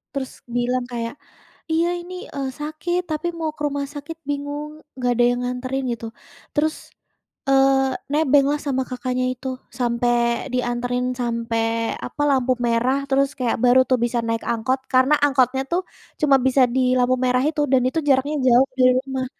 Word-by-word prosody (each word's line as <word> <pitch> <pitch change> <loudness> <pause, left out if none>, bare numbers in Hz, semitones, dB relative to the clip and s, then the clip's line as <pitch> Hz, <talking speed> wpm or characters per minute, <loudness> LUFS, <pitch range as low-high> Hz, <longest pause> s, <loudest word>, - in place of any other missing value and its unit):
Terus 265 -2 -3 0.2
bilang 245 0 0
kayak, 235 -1 -4 0.6
"Iya 330 +1 +2
ini, 350 +1 -9 0.2
eee, 275 -1 -2
sakit 325 +4 -2
tapi 310 +3 -2
mau 320 -2 -2
ke - - -16
rumah 285 0 -2
sakit 295 +3 -7
bingung 290 +1 -4 0.2
nggak 250 -1 0
ada 240 - +2
yang 245 0 0
nganterin 255 +2 -3
gitu," 230 -1 -5 0.5
terus, 310 +1 +1 0.7
eee, 270 -1 +4 0.2
nebenglah 290 -1 +3
sama 265 -3 -1
kakaknya 255 0 -2
itu 255 +1 -8 0.3
sampai 235 0 +1
dianterin, 245 0 -1 0.2
sampai 230 -1 -1 0.4
apa - - -6
lampu 260 -1 +2
merah 240 +3 +2
terus 275 +1 +3
kayak 245 -2 0
baru 250 +1 +6
tuh 255 - +4
bisa 240 0 -1
naik 230 0 -1
angkot 235 +3 0
karena 260 +3 +5
angkotnya 265 -2 +2
tuh 350 +2 +2 0.4
cuma 285 -3 +5
bisa 265 0 +4
di 260 - +3 0.2
lampu 250 +1 +3
merah 250 0 +2
itu 305 -1 -2
dan 260 -2 +5
itu 290 +6 0
jaraknya 275 +3 +2
jauh 250 +2 +5
dari 255 0 +6
rumah. 265 -1 -3
260 Hz, 160 wpm, -22 LUFS, 245-285 Hz, 0.7 s, baru